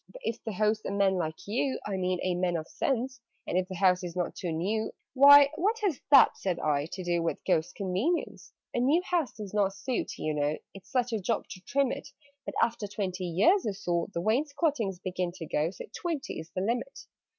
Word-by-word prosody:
"But - - -12
if 230 - -3
the 220 - -4
host's 215 +2 +1
a - - -2
man 200 -1 +3
like 160 -4 -3
you 260 +6 -1
I 200 - -2
mean 185 -1 0
a 185 - +1
man 175 0 0
of 160 -1 -3
sense; 260 -1 -2 0.2
And - - -3
if 185 0 +1
the 185 - -6
house 180 0 +3
is 175 -1 -5
not 180 -1 -1
too 175 - -4
new 200 +7 -1
" - - -61
"Why, 280 +1 +9
what 415 +7 +1
has 360 -10 0
that," 275 -3 +7
said 185 -3 -1
I, 145 -1 0
"to 185 - -5
do 175 -1 0
With 165 - -3
Ghost's 175 -1 +1
convenience?" 200 - -2 0.2
"A - - 0
new 290 +8 +3
house 345 -7 0
does 210 -3 -8
not 200 -2 +1
suit, 250 +4 -3
you 155 - -2
know 150 +1 0 0.2
It's 195 +3 -13
such 250 -2 0
a 220 - 0
job 225 +5 -1
to 185 - -9
trim 275 -1 +2
it: 275 - -5 0.4
But, - - -4
after 230 -3 -1
twenty 190 -3 -3
years 205 - +3
or 210 - 0
so, 175 -4 -1
The 170 - -3
wainscotings 260 - 0
begin 180 -1 -3
to 175 -3 -7
go, 155 +1 0
So 180 - -9
twenty 330 -6 -3
is 160 - -9
the 185 - -1
limit." 240 - -2
200 Hz, 225 wpm, -29 LUFS, 180-255 Hz, 0.4 s, Why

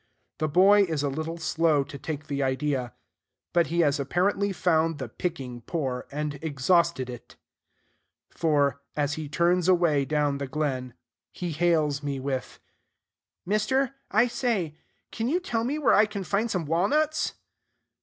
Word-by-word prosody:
The 155 - +1
boy 190 +6 +6
is 160 -5 -2
a 145 - +1
little 160 +4 -4
slow 160 -2 +2
to 140 - -9
take 150 -1 -5
the 140 -2 -3
idea: 130 -2 -1 0.6
but 170 -1 +3
he 170 +1 +1
has 145 -2 +2
apparently 195 +8 +1
found 165 -3 +1
the 135 - -5
picking 135 -9 -5
poor, 130 -2 -3
and 145 0 -3
exhausted 160 -1 +1
it; 120 -2 -10 1.0
for, 145 -4 +1
as 145 -1 0
he 155 -1 -5
turns 175 +3 +2
away 170 -6 +3
down 145 0 0
the 140 - -3
glen, 130 -4 -2 0.4
he 175 -2 -4
hails 155 -3 +1
me 140 -2 -3
with, 130 -1 -4 0.9
"Mister, 225 +7 +1 0.2
I 220 +3 +4
say, 225 - -1 0.4
can 230 +1 -2
you 340 +5 +2
tell 230 -11 -2
me 275 +6 -1
where 295 -6 +3
I 210 +1 +5
can 200 -2 -5
find 210 +5 0
some 180 -6 -1
walnuts?" 290 - +1
160 Hz, 155 wpm, -26 LUFS, 140-185 Hz, 1.0 s, boy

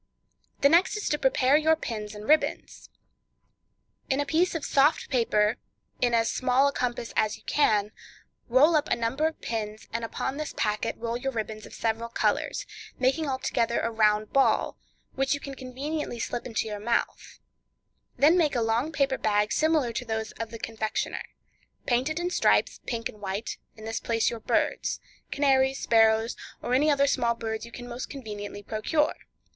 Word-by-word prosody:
The 280 - +6
next 345 +6 +4
is 420 - -3
to 295 - 0
prepare 265 +1 +4
your 315 +1 +4
pins 215 -8 -5
and 210 +1 -8
ribbons. 310 +1 +1 1.2
In 270 0 +1
a 290 - +1
piece 330 +5 +1
of 305 -3 -3
soft 285 +3 +3
paper, 230 -3 +2 0.4
in 240 -1 +3
as 225 -1 +2
small 255 +2 +3
a - - +1
compass 240 -2 -2
as 215 -1 +1
you - - -22
can, 210 -8 +2 0.6
roll 285 +7 +5
up 300 - +2
a - - +3
number 240 +7 0
of 320 - -6
pins, 215 -2 -4
and 230 0 -2
upon 265 +4 -3
this 305 0 -5
packet 210 -1 0
roll 235 0 -3
your 270 +2 -2
ribbons 220 -2 -5
of - - -12
different 230 +1 -2
colors, - - 0 0.3
making 275 +4 +1
altogether 240 -3 0
a 230 - -1
round 215 -1 +2
ball, 275 - +3 0.4
which 270 +2 +1
you - - -6
can 280 -1 -7
conveniently 270 +2 -4
slip 240 - -3
into 225 -2 -1
your 210 -1 -5
mouth; 235 +3 -2 0.8
then 300 +5 +6
make 305 -5 +2
a 240 - +1
long 230 +7 0
paper 275 -3 0
bag 210 -1 +1
similar 310 -5 +2
to 240 - -3
those 220 -1 -3
of 230 -1 -3
the 230 - -7
confectioner; 220 -1 -3 0.6
paint 250 +3 +1
it 315 +2 -2
in 350 +1 -2
stripes—pink 230 -8 +1
and 210 - -13
white; 200 +3 -4 0.2
in 215 - -11
this 225 0 -3
place 225 -1 +1
your 235 - -5
birds—canaries, 270 +4 0
sparrows, 225 -1 +3 0.3
or 245 - -1
any 290 +4 +4 0.2
small 240 -4 +1
birds 225 0 -4
you - - -13
can 245 +1 -8
most 245 +1 -6
conveniently 205 -6 -7
procure. 265 +9 0
240 Hz, 175 wpm, -27 LUFS, 220-280 Hz, 1.2 s, The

